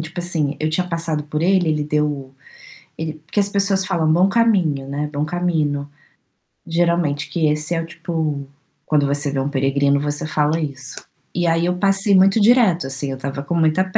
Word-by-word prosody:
tipo 165 +2 -5
assim, 160 -5 -1
eu 155 0 0
tinha 180 +3 -1
passado 165 -3 -2
por 150 +1 -3
ele, 185 -2 +3
ele 150 -1 0
deu 150 0 +1
o 135 -2 -6 0.6
ele 160 -1 -4
porque 160 +7 -3
as 200 - +2
pessoas 195 -1 +1
falam: 165 -4 +1
"Bom 180 +4 +4
caminho.", 185 -12 +2
né, 145 +2 -3
"bom 145 +1 -1
camino". 155 -4 -1 0.8
Geralmente 170 -3 0 0.2
esse 150 +2 0
é 165 - 0
o - - -5
tipo, 160 -4 -3 0.4
quando 150 -2 +2
você 145 0 +1
vê 140 - -2
um 135 +2 -1
peregrino, 140 +1 +1
você 145 +1 -2
fala 155 +1 +1
isso, 135 -4 -5 0.4
e 175 -1 0
aí 165 +1 +2
eu 180 0 0
passei 195 +1 +3
muito 195 +3 +5
direto, 205 - +4
assim, 135 +1 -2
eu 135 - -3
estava 140 +1 -5
com 175 - -3
muita 165 +2 +2
155 Hz, 190 wpm, -20 LUFS, 145-175 Hz, 0.8 s, muito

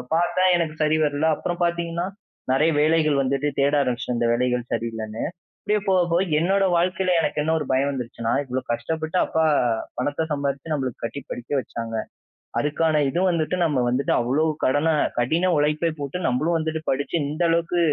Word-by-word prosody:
பார்த்தேன், 175 +2 +3
எனக்கு 160 -2 -2
சரி 155 +1 +2
வரல. 145 +1 0
அப்புறம் 175 +3 -4
பார்த்தீங்கன்னா, 170 0 -1 0.5
நிறைய 155 +5 +3
வேலைகள் 155 -1 +3
வந்துட்டு 135 +2 0
தேட 140 +1 +2
ஆரம்பிச்சுட்டேன், 125 -2 -2
இந்த 120 - +2
வேலைகள் 125 0 0
சரியில்லன்னு. 110 -1 -3 0.4
அப்பிடியே 210 0 0
போக, 190 -1 +4
போக 175 +2 +3 0.2
என்னோட 195 +4 +2
வாழ்க்கையில 185 +2 +1
எனக்கு 155 - -1
என்ன 155 +2 0
ஒரு 150 - -3
பயம் 135 +2 +2
வந்துருச்சுன்னா, 120 -3 -3
இவ்ளோ 130 -1 -3
கஷ்டப்பட்டு 160 +8 -2
அப்பா 160 - 0 0.5
பணத்த 145 +5 -1
சம்பாரிச்சு 140 +1 -2
நம்மளுக்கு 130 -5 -3
கட்டி 115 +5 -4
படிக்க 120 +2 -7
வச்சாங்க. 115 -3 -5 0.6
அதுக்கான 150 +1 +1
இது 170 - -1
வந்துட்டு 165 0 0
நம்ம 150 -5 +1
வந்துட்டு 130 +3 +1
அவ்ளோ 130 +6 +1 0.2
கடன, 145 +4 +2 0.3
கடின 165 +9 +2
உழைப்பை 150 +3 +1
போட்டு 140 +5 -4
நம்மளும் 155 +7 +1
வந்துட்டு 160 0 -2
படிச்சு 140 +5 -1
இந்த 155 +4 -5
அளவுக்கு 170 +1 +1
150 Hz, 160 wpm, -23 LUFS, 130-165 Hz, 0.6 s, போக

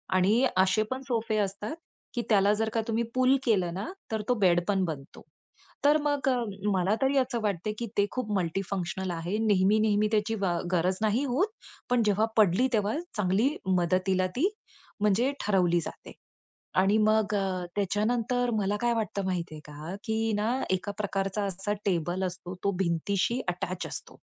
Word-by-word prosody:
आणि 210 +8 +4
असे 190 +3 +4
पण 260 +1 -2
सोफे 225 -3 0
असतात, 205 +5 -2 0.4
की 240 - -1
त्याला 205 -1 +5
जर 220 +1 0
का 225 - +1
तुम्ही 230 +1 0
पूल 255 +1 +4
केलं 185 -8 +1
ना, 195 - -4 0.2
तर 220 -1 -1
तो - - +5
बेड 175 -1 +4
पण 195 -2 +2
बनतो. 145 -4 -7 0.6
तर 295 +1 +6
मग 290 -2 +1 0.4
मला 190 +3 +2
तरी 270 +1 +2
असं 250 -3 +1
वाटते, 205 0 -1
की 235 - -3
ते 205 - +4
खूप 250 -5 -3
मल्टी 180 +1 -1
फंक्शनल 190 -1 -2
आहे. 170 +5 -2
नेहमी-नेहमी 210 +2 +3
त्याची 220 +1 +1
व 175 -3 +1
गरज 185 +1 +1
नाही 220 +5 +2
होत, 280 - +1 0.4
पण 245 -2 +3
जेव्हा 210 +1 +3
पडली, 210 +5 +4
तेव्हा 210 0 +1 0.2
चांगली 210 - +2 0.2
मदतीला 185 +2 +1
ती 350 +10 +2 0.5
म्हणजे 210 +6 +2
ठरवली 180 -4 +3
जाते. - - -8 0.7
आणि 195 +3 +4
मग 215 -1 +2
अ, 190 -2 -1
त्याच्यानंतर 230 +5 +1
मला 205 -1 0
काय 240 0 +2
वाटतं, 210 -3 -2
माहिती 175 -4 -2
आहे 155 - -8
का, 150 +4 -7
की 220 0 0
ना, 210 +2 0 0.2
एका 190 +2 -1
प्रकारचा 195 0 -1
असा 195 +1 -2
टेबल 175 0 0
असतो, 180 0 -5
तो 200 - +3
भिंतीशी 195 +7 0
अटॅच 180 +1 -3
असतो, - - -8
205 Hz, 165 wpm, -28 LUFS, 185-225 Hz, 0.7 s, तर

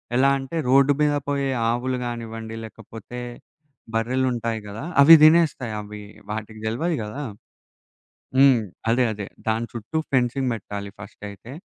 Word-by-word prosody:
ఎలా 135 +2 +4
అంటే 135 +4 -7
రోడ్డు 135 +2 +5
మీద 150 -1 +3
పోయే 140 -1 0 0.2
ఆవులు 125 +2 -1
గానివ్వండి, 115 -1 -6
లేకపోతే 115 +2 -10 0.8
బర్రెలుంటాయి 115 -1 0
గదా! 105 +5 -7 0.2
అవి 165 +4 +10
తినేస్తాయి. 155 -8 +4
అవి 105 0 -9 0.3
వాటికి 110 0 -6
తెల్వది 150 +9 -1
గదా! 105 +7 -6 1.2
హ్మ్. 135 -4 +6 0.3
అదే. 125 +2 +3
అదే. 100 -2 -6 0.2
దాని 115 +1 0
చుట్టూ 120 +7 -4
ఫెన్సింగ్ 130 +1 +1
పెట్టాలి 100 -2 -6
ఫస్టయితే. 105 +3 -10
120 Hz, 125 wpm, -23 LUFS, 110-135 Hz, 1.2 s, అవి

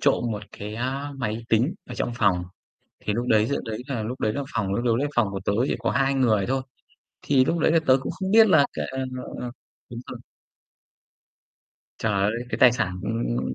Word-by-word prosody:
trộm 140 -3 +2
một 105 -1 -4 0.2
cái, 105 +1 -6
a, 135 +5 -3
máy 115 -2 -3
tính 120 - +2
ở - - -7
trong 120 - -2
phòng. 95 -7 +2 0.6
Thì 105 - -2
lúc 120 +3 -2
đấy 110 -1 +4
giữa 140 - -1
đấy 110 -1 -4
là 130 -6 -3
lúc 120 +4 -5
đấy 110 - +1
là 140 - -2
phòng 100 -2 0
lúc 120 +1 +1
đấy 145 - 0
phòng 120 -4 +3
của 95 - -4
tớ - - +1 0.2
chỉ - - 0
có - - -1
2 135 +1 +2
người 110 -7 +2
thôi. 130 +1 0 0.6
Thì 135 -2 +4
lúc 170 - 0
đấy 160 - +3
là 165 - +5
tớ 130 - +6
cũng - - -3
không 190 0 -4
biết 220 +1 +7
là 145 -6 +6
cà - - -3
ờ, 130 - -4 0.4
ờ, 125 - -4 0.4
đúng 120 0 -6
rồi. - - -7 1.8
Trời 110 -2 0
ơi, 100 +2 +2 0.2
cái - - -2
tài 125 - +7
sản, 95 -6 -1
ưm, 65 - -2
120 Hz, 215 wpm, -25 LUFS, 105-135 Hz, 1.8 s, biết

